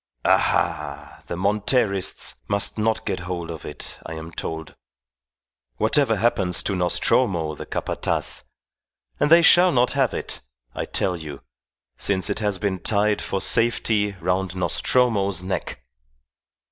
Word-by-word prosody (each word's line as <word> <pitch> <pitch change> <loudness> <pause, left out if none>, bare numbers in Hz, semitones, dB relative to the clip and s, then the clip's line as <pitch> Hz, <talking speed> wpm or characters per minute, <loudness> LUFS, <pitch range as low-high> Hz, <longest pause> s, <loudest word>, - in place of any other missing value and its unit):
Aha! - - 0
the - - -4
Monterists 100 0 +1
must 100 +2 +1
not 110 0 0
get - - -2
hold 85 -1 -5
of 80 - -8
it, 75 - -7
I 80 - -7
am 80 +1 -8
told, 80 -1 -6 1.0
whatever 115 - +2
happens 95 -5 +1
to 100 - -1
Nostromo 85 -2 +1
the - - -9
Capataz; - - -2 0.8
and - - +2
they 170 +1 +7
shall 180 +2 +6
not 125 -4 +2
have 135 -3 +1
it, - - -4 0.3
I - - -3
tell 90 - 0
you, 75 -4 -8 0.5
since 100 0 +1
it 100 - -2
has 105 -3 0
been 95 -2 -2
tied 105 +2 +1
for 95 - -2
safety 110 -2 +1
round 90 +1 -1
Nostromo's 100 -1 +1
neck." 90 -9 -4
100 Hz, 135 wpm, -23 LUFS, 90-110 Hz, 1.0 s, they